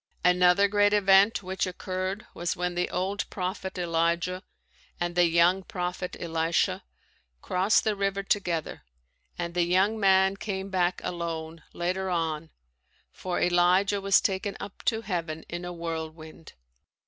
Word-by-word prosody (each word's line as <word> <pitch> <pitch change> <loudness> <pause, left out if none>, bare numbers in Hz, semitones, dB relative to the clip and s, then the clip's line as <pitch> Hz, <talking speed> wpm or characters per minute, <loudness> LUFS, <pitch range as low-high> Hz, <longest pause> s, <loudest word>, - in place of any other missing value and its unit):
Another 180 +2 +5
great 205 0 +3
event 200 +1 +4
which 190 +1 -2
occurred 185 +2 -4
was 175 +1 -2
when 180 0 -2
the 175 +1 -1
old 190 +3 -2
prophet 190 0 -4
Elijah 170 +1 0 0.6
and 175 0 -1
the 175 0 +4
young 170 +3 +3
prophet 180 0 -4
Elisha 170 +3 0 0.6
crossed 190 +4 +2
the 215 -2 0
river 195 0 -1
together 175 -6 -1 0.6
and 170 -1 -4
the 175 - +1
young 190 +5 +2
man 190 -1 +4
came 195 -2 -4
back 180 -1 0
alone 165 -1 -4
later 185 +2 -2
on 165 -2 -2 0.6
for 180 -1 -3
Elijah 180 +3 +3
was 195 0 +5
taken 195 +1 -2
up 195 0 -9
to 225 -1 +1
heaven 165 -6 -4
in 175 +1 -6
a 175 - -5
whirlwind. 160 -2 -7
180 Hz, 135 wpm, -27 LUFS, 170-195 Hz, 0.6 s, Another